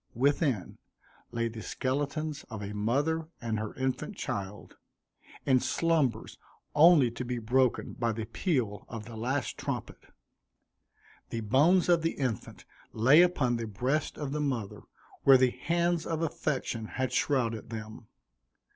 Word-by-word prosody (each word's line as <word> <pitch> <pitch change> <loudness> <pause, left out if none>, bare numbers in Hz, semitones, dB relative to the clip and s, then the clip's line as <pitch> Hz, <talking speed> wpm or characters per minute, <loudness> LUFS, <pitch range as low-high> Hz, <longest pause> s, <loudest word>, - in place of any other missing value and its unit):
Within 135 - +1 0.5
lay 115 0 -1
the 115 -1 -7
skeletons 145 +5 -2
of 110 -3 -6
a 100 +1 -5
mother 145 +10 0
and 110 -2 -2
her 110 -1 -5
infant 130 -1 -2
child, 100 +1 -5 0.7
in 130 -2 +4
slumbers 150 -7 0 0.3
only 150 -5 +6
to 120 - -5
be 125 0 -3
broken 125 +2 +1
by 115 -1 -1
the 110 0 -4
peal 115 - -1
of 110 -2 -6
the 115 0 -9
last 125 +4 -2
trumpet. - - -5 1.2
The 115 - -3
bones 145 - +4
of 175 -2 +4
the 165 +1 0
infant 125 -7 -4 0.3
lay 135 +9 +6
upon 140 -9 +2
the 115 -1 -4
breast 125 +9 -1
of 145 -3 -4
the 150 +1 -1
mother, 125 -8 -2 0.4
where 135 -1 +8
the 130 -1 +3
hands 170 +2 0
of 165 0 -1
affection 130 -7 -2
had 130 -1 -1
shrouded 115 -7 0
them. 110 0 -8
130 Hz, 140 wpm, -29 LUFS, 115-150 Hz, 1.2 s, where